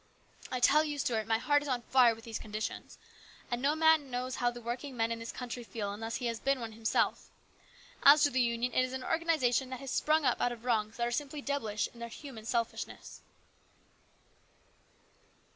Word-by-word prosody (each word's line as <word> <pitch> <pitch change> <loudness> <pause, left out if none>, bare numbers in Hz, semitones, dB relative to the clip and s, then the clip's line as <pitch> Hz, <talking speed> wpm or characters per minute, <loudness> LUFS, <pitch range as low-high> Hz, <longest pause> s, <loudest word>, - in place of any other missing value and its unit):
I 255 - -2
tell 300 +5 +5
you, 295 -2 -3
Stuart, 225 -6 -1
my 225 0 +3
heart 290 +5 +2
is 290 - -7
on 250 -3 -1
fire 245 -3 +5
with 225 - -15
these 225 -2 -5
conditions, 215 0 -5 0.5
and 240 0 -1
no 285 +3 +2
man 315 -3 +4
knows 250 0 -3
how 245 - +2
the 240 0 -8
working 245 +3 -5
men 225 0 +1
in 230 - -3
this 230 +1 -6
country 245 -1 -6
feel 205 -1 -4
unless 225 +2 -4
he 250 - -3
has 230 -1 -2
been 275 0 +1
one 230 -2 -5
himself. 220 0 0 0.7
As 285 +1 +8
to 285 - +4
the 255 - +2
Union, 235 0 0
it 255 - +3
is 255 0 -3
an 260 -1 -4
organisation 310 -7 +1
that 260 -1 -5
has 275 -2 -6
sprung 310 -1 +2
up 250 - +2
out 245 - +2
of 240 0 -9
wrongs 220 -2 0
that 235 - 0
are 240 - -1
simply 290 +4 -3
devilish 225 -7 -1
in 235 - -15
their 235 0 -6
human 230 -3 -10
selfishness." 230 0 -3
245 Hz, 205 wpm, -32 LUFS, 230-275 Hz, 0.7 s, As